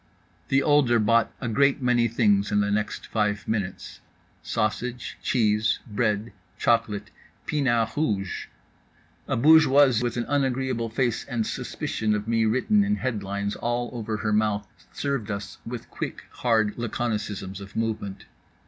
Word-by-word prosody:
The 135 +1 +3
older 145 -5 +4
bought 115 +1 +3
a 125 - -3
great 140 +5 +3
many 125 -2 +3
things 105 -3 +2
in 105 - +3
the 105 0 +1
next 105 +1 -2
five 105 -2 -1
minutes: 100 -4 -3 0.4
sausage, 120 +3 -2
cheese, 105 -3 +2
bread, 110 0 -1 0.2
chocolate, 115 -3 +1 0.3
pinard 120 -7 +1
rouge. 100 - -1 0.8
A - - 0
bourgeoise 140 -3 +6
with 120 -1 -2
an 120 - -1
unagreeable 130 -4 0
face 120 0 0
and 120 -5 -2
suspicion 105 0 -2
of 105 +1 -4
me 115 -1 +2
written 130 - +3
in 205 +1 +1
headlines 100 - -2
all 120 0 -2
over 110 -2 -3
her 105 0 -1
mouth 105 -1 +1 0.2
served 140 -6 -2
us 100 0 -5
with 120 0 -6
quick - - -5
hard 110 -3 +1
laconicisms 105 -4 -3
of 100 0 -11
movement. 110 -3 -3
115 Hz, 140 wpm, -25 LUFS, 105-125 Hz, 0.8 s, bourgeoise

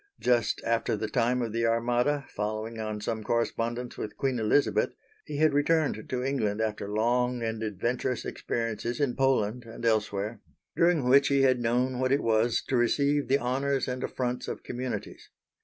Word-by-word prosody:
Just 120 -3 +1
after 115 -1 +1
the 110 - -2
time 125 +2 +1
of 115 -2 -4
the 115 0 +1
Armada, 120 +5 +1
following 110 +2 -4
on 110 -1 -4
some 110 +1 -3
correspondence 120 +1 -2
with 105 - -5
Queen 130 -3 0
Elizabeth, 110 +6 +2 0.3
he 145 - -5
had 155 -1 +4
returned 145 -5 +1
to 125 -1 -2
England 115 -6 0
after 105 -2 -2
long 120 +3 +1
and 110 -1 -2
adventurous 115 +4 -2
experiences 115 +2 -3
in 140 -4 +1
Poland 125 -3 +1
and 115 0 -8
elsewhere, 105 -1 0 0.3
during 170 -6 +3
which 140 +2 +6
he 140 -1 +3
had 130 -2 +4
known 125 +2 0
what 130 0 +1
it 140 - +2
was 115 +1 +2
to 135 - 0
receive 140 +3 +2
the 135 +2 +4
honours 135 +1 0
and 125 0 -3
affronts 125 -1 -2
of - - -5
communities. 125 +1 -5
120 Hz, 170 wpm, -28 LUFS, 110-130 Hz, 0.3 s, which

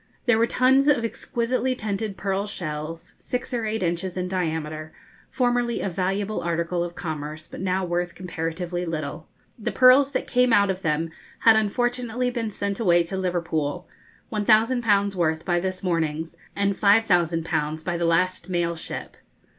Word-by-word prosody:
There 240 -3 +4
were 230 - +4
tons 265 +3 +4
of 255 -6 +3
exquisitely 255 +2 -1
tinted 210 -2 -3
pearl 195 +1 -1
shells, 160 -3 -5
six 250 0 -4
or 230 -2 -1
eight 215 -2 -1
inches 175 +2 -2
in 180 0 -1
diameter, 160 -4 -3 0.4
formerly 245 -1 +1
a 195 - -2
valuable 195 +4 -1
article 170 +1 -1
of 175 0 -6
commerce, 155 -1 -5
but - - -9
now 190 0 0
worth 175 0 -2
comparatively 175 0 -3
little. 155 -1 -4 0.3
The 215 - -2
pearls 260 +2 +6
that - - -1
came 250 -2 +3
out 200 -2 +5
of 190 0 -5
them 160 0 0 0.3
had 225 -1 +7
unfortunately 245 +3 0
been 235 -3 -2
sent 200 -1 -3
away 175 -6 +4
to 170 +3 -5
Liverpool 170 -5 -2 0.5
1,000_l_. 215 -1 +3
worth 160 -3 0
by 175 -2 +2
this 185 +1 -3
morning's, 160 -2 -1 0.2
and 200 0 +1
5,000_l_ 170 -7 +2
by 175 - -1
the 170 0 0
last 185 +3 +1
mail 170 -1 0
ship. 160 - -7
185 Hz, 155 wpm, -24 LUFS, 170-220 Hz, 0.5 s, had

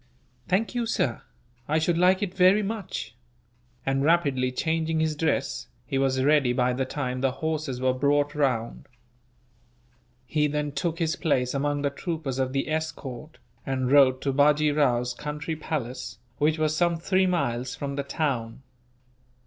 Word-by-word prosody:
"Thank 205 +7 +1
you, 240 -2 -1
sir; 125 - 0 0.5
I 155 - +2
should 165 +2 +1
like 185 +3 +3
it 190 -3 -3
very 190 +3 +5
much;" 200 - -4 0.7
and, 135 0 +1
rapidly 140 -6 +2
changing 160 +3 -1
his 160 -1 0
dress, 145 - -1 0.2
he 135 - -1
was 130 -1 +1
ready 140 -3 +3
by 125 0 +1
the 130 +1 -1
time 130 -2 -3
the 135 -1 +1
horses 155 -3 -3
were 130 0 +2
brought 145 +2 +1
round. 125 -6 -1 1.4
He 150 +3 +1
then 150 0 -2
took 160 +4 -2
his 165 -2 0
place 125 -5 0
among 145 +1 -1
the 140 - +1
troopers 150 -4 -4
of 130 -1 0
the 135 0 -1
escort, 155 -2 -4 0.3
and 130 -2 -1
rode 130 -2 +5
to 140 - 0
Bajee 150 +1 +3
Rao's 125 -4 +2
country 150 +5 -4
palace, 140 -5 -4 0.2
which 155 +2 +2
was 155 -1 +1
some 170 0 +2
three 185 +3 +2
miles 125 -8 -1
from 140 -1 -4
the 140 - -1
town. 130 -5 -2
145 Hz, 155 wpm, -26 LUFS, 130-160 Hz, 1.4 s, very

